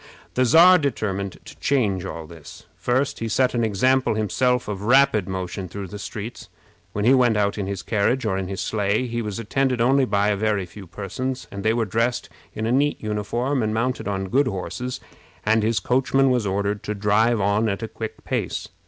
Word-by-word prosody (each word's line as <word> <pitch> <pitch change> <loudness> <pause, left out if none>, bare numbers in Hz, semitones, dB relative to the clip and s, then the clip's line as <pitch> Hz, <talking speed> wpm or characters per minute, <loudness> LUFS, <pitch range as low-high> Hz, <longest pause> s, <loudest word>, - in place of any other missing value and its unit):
The 130 - +2
Czar 175 +8 +7
determined 100 - -2
to - - -12
change 100 -10 +1
all 80 -3 -6
this. 80 -1 -13
First 130 +3 0
he 115 - -2
set 125 +4 +2
an 120 -1 +1
example 125 +4 +2
himself 125 +4 +1
of 100 -2 -4
rapid 120 -4 +4
motion 95 0 -4
through 95 +1 -7
the 105 - -8
streets. 110 +3 -7 0.4
When 105 +1 -2
he 125 - +6
went 125 -4 +4
out 100 -1 +1
in 95 - -2
his 100 -1 -4
carriage 115 +4 +1
or 100 -3 0
in 95 -1 -2
his 95 0 -4
sleigh, 105 +3 0
he 120 -1 -3
was 105 -2 -4
attended 125 +3 0
only 130 +3 +4
by 100 -3 +1
a 105 - +2
very 105 -2 0
few 95 +2 -12
persons, 125 +8 -4
and 100 0 -6
they 110 +1 +3
were 115 -1 0
dressed 115 +4 -1 0.3
in 110 - -2
a 115 - 0
neat 145 +3 +2
uniform 120 +6 -1
and 110 0 -1
mounted 125 +1 -1
on 95 -1 -2
good 135 +6 +3
horses, 125 +5 -4 0.4
and 110 +1 +3
his 110 -1 +1
coachman 135 +5 +2
was 120 -5 +1
ordered 100 +1 -1
to 105 - -4
drive 105 +3 +2
on 100 +3 +2
at 100 +3 -3
a - - -2
quick 110 0 -7
pace. - - -3
110 Hz, 205 wpm, -23 LUFS, 100-125 Hz, 0.4 s, Czar